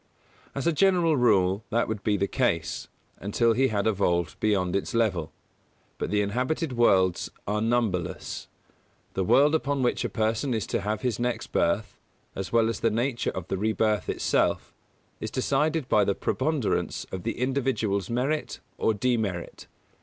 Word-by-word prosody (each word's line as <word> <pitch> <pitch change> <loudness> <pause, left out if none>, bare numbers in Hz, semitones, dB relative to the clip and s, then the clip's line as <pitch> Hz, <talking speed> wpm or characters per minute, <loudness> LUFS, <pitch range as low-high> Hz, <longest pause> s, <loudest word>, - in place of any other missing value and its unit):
As 140 - -3
a 170 - +4
general 175 -2 +3
rule 100 -5 +3
that 115 +2 +1
would 110 -2 -3
be 105 -1 +2
the 100 - +1
case, 120 -11 -1 0.3
until 115 +4 +2
he 130 +4 +3
had 100 -4 -1
evolved 90 -5 0
beyond 95 -4 +1
its 100 - -2
level; 95 -9 +1 0.7
but - - -2
the 105 0 +2
inhabited 130 +8 -1
worlds 95 -7 +3 0.2
are 105 +1 0
numberless. 110 -7 -1 0.7
The 95 - 0
world 145 - +4
upon 145 -3 0
which 120 - +1
a - - -1
person 115 +3 0
is 110 - -1
to - - 0
have 105 +1 -2
his 125 -4 -1
next 120 0 -2
birth, 105 +6 0 0.4
as 95 - -5
well 115 -1 +4
as 115 -2 -2
the 115 - +2
nature 120 +2 -1
of 90 -3 -5
the 95 - -2
rebirth 110 -2 +1
itself, - - 0 0.5
is 110 - -4
decided 140 +4 0
by 105 - +4
the 100 0 +1
preponderance 140 -3 -1
of 95 - -4
the 115 - -3
individual's 125 -7 0
merit 135 +6 -1 0.2
or 110 - +2
demerit. 105 -6 -2
110 Hz, 160 wpm, -26 LUFS, 100-130 Hz, 0.7 s, a